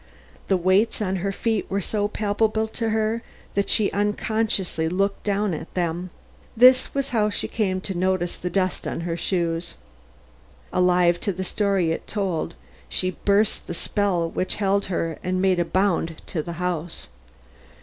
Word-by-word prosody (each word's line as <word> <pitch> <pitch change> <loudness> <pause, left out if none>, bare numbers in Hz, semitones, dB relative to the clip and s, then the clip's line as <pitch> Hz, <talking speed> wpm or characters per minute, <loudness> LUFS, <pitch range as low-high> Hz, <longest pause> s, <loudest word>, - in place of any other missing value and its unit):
The 190 - +3
weights 185 +5 +2
on 190 -3 -1
her 195 +2 -1
feet 220 +2 -1
were 195 - 0
so 205 +2 0
palpable 215 +1 0
to 225 0 -2
her 220 +1 0 0.3
that 200 0 0
she 210 -3 +3
unconsciously 205 -5 0
looked 195 +3 0
down 205 -2 0
at 160 - -6
them. 175 0 -1 0.5
This 255 +3 +6
was 275 -1 0
how 215 -3 +2
she 205 - 0
came 190 -5 0
to 195 - -2
notice 180 -1 0
the 180 - -4
dust 185 0 -1
on - - -3
her 165 0 -2
shoes. 170 -1 -1 1.0
Alive 180 -1 +3
to 200 - -1
the 190 0 -4
story 195 -3 +1
it - - -4
told, 190 -7 -2 0.3
she 185 - 0
burst 200 +3 +1
the 170 - -4
spell 185 -3 0
which 185 +2 +1
held 200 -1 +1
her 165 -3 -2
and 185 0 0
made 185 -1 +3
a 175 - +2
bound 170 -3 0
toward 155 -4 -3
the 170 - -4
house. 175 - -3
190 Hz, 165 wpm, -24 LUFS, 175-210 Hz, 1.0 s, This